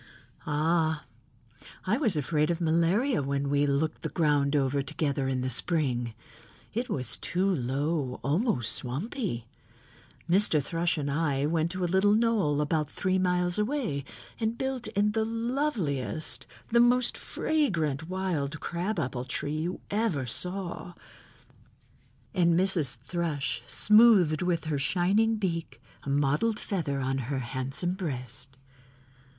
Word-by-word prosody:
"Ah, 160 0 +1 0.8
I 200 +5 +2
was 235 - +1
afraid 150 +1 +1
of 170 -1 0
malaria 170 - +2
when 140 0 -1
we 145 0 +3
looked 150 +3 0
the - - -3
ground 145 -3 +2
over 140 0 +2
together 140 0 -1
in 130 -1 0
the 130 - -1
spring. 125 -10 0 0.6
It 240 +3 -2
was 125 -3 -2
too 185 +2 0
low, 140 -3 -1
almost 140 - +1
swampy. 130 - -3 0.8
Mr. 175 -3 +3
Thrush 170 +4 0
and 140 -1 -2
I 145 -2 +1
went 160 +1 +1
to 185 -1 -3
a - - +3
little 190 +4 +3
knoll 215 -10 +2
about 150 0 0
three 185 +2 0
miles 180 0 +1
away 210 - -1 0.4
and 225 0 -1
built 265 -2 -3
in 210 -1 +1
the 220 +1 +1
loveliest, 185 - -2 0.2
the 235 - +5
most 240 +1 +4
fragrant 165 - -1
wild 170 -6 -2
crabapple 170 - -2
tree 145 +3 -2
you 170 +3 -3
ever 200 - 0
saw," 180 +5 -3 1.4
and 170 -3 +3
Mrs. 175 -10 +1
Thrush 150 +2 -3
smoothed 210 -8 +5
with 170 -3 0 0.2
shining 195 +9 +2
beak 175 -6 -3 0.2
a - - -6
mottled 145 +11 +1
feather 150 -8 -2
on 135 +1 0
her 135 +2 -2
handsome 130 +7 -2
breast. 130 - -6
165 Hz, 130 wpm, -28 LUFS, 140-195 Hz, 1.4 s, the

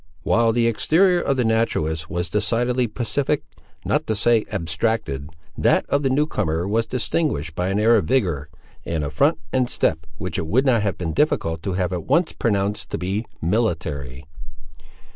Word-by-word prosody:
While 115 0 +3
the 115 +1 +2
exterior 175 - +3
of 135 - 0
the 125 - +2
naturalist 80 -8 0
was 85 0 -2
decidedly 120 +5 +1
pacific, 130 +6 -1 0.4
not - - 0
to 110 - 0
say 115 +1 +3
abstracted, 85 -5 -2 0.3
that - - +2
of 140 - +2
the 135 - +1
new 145 +3 +2
comer 80 - -1
was 110 +2 0
distinguished 115 - -1
by 90 +3 -2
an 95 +2 0
air 115 +2 +5
of 100 -7 +2
vigour, 85 - 0 0.3
and 80 -2 -2
a 70 - -3
front 140 - +2 0.2
and 130 -1 +2
step 80 +1 0
which - - -3
it 80 - -3
would 130 - +2
not 120 -5 +3
have 100 -2 -1
been 80 -3 -3
difficult 80 - 0
to 95 +2 -3
have 90 0 -1
at 85 -3 -4
once 170 0 +2
pronounced 105 -2 -1
to - - -3
be 100 +5 -3 0.2
military. 80 - -1
105 Hz, 180 wpm, -22 LUFS, 80-120 Hz, 0.4 s, air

